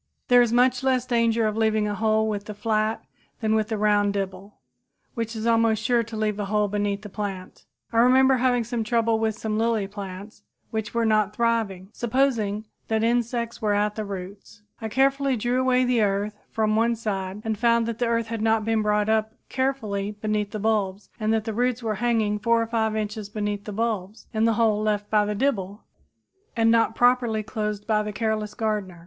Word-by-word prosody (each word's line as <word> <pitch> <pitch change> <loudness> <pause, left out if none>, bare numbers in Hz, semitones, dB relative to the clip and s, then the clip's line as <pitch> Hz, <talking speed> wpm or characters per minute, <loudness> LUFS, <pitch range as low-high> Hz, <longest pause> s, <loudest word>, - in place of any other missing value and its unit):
There 245 0 +7
is 240 -2 +2
much 250 +1 +3
less 260 -2 +1
danger 230 -2 +2
of 215 -1 0
leaving 220 -1 +1
a 205 - -2
hole 220 +1 +1
with 205 -1 -3
the 210 - -7
flat 215 +1 -1 0.4
than 220 -1 0
with 215 -1 +1
the 220 - -2
round 205 -1 +2
dibble, 195 0 -5 0.6
which 230 -2 -4
is 220 0 -4
almost 225 -2 +2
sure 240 0 +3
to 225 -1 -7
leave 215 -1 -1
a 205 - -1
hole 210 +1 +1
beneath 205 0 -2
the - - -6
plant. 195 -2 -6 0.3
I - - 0
remember 260 +2 +5
having 245 -1 +2 0.2
trouble 230 0 +1
with 220 -1 -1
some 215 0 -2
lily 225 -3 +1
plants 200 +1 -8 0.3
which 220 0 -4
were 230 -1 +2
not 215 -2 +2
thriving. 225 -6 0
Supposing 230 -4 0 0.2
that 220 0 0
insects 235 0 -1
were 210 -2 +1
at 210 0 +1
the 215 - -4
roots, 200 +1 -8 0.2
I 220 - -3
carefully 270 +2 +2
drew 240 +3 0 0.3
the 245 -2 +2
earth 205 0 0
away 210 - -33
from 215 -1 0
one 230 +1 +2
side, 200 -2 -4
and 220 -1 0
found 235 +1 +2
that 230 -1 -4
the 240 - +1
earth 230 0 +1
had 225 -1 -4
not 220 -1 +2
been 225 -1 +1
brought 210 0 +1
up 220 0 0
carefully 215 -7 -2
beneath 210 -1 -1
the 215 - -5
bulbs 205 -2 -1
and 215 0 0
that 220 -1 +1
the 220 0 -4
roots 245 +1 0
were 220 -1 0
hanging 220 -3 +1
4 230 +2 +2
or - - -2
5 220 -1 0
inches 210 -1 -3
beneath 205 -1 -3
the 210 - -5
bulbs 215 -2 -3
in 220 0 +2
the 230 - +3
hole 215 -2 +2
left 210 -1 -1
by 210 -1 +4
the 210 0 -2
dibble 205 -5 -1 0.7
and 225 0 +4
not 225 -1 +3
properly 245 -3 +2
closed 210 -1 -4
by 215 -1 +2
the 210 0 -4
careless 215 0 -2
gardener. 210 -5 -2
220 Hz, 200 wpm, -24 LUFS, 210-230 Hz, 0.7 s, There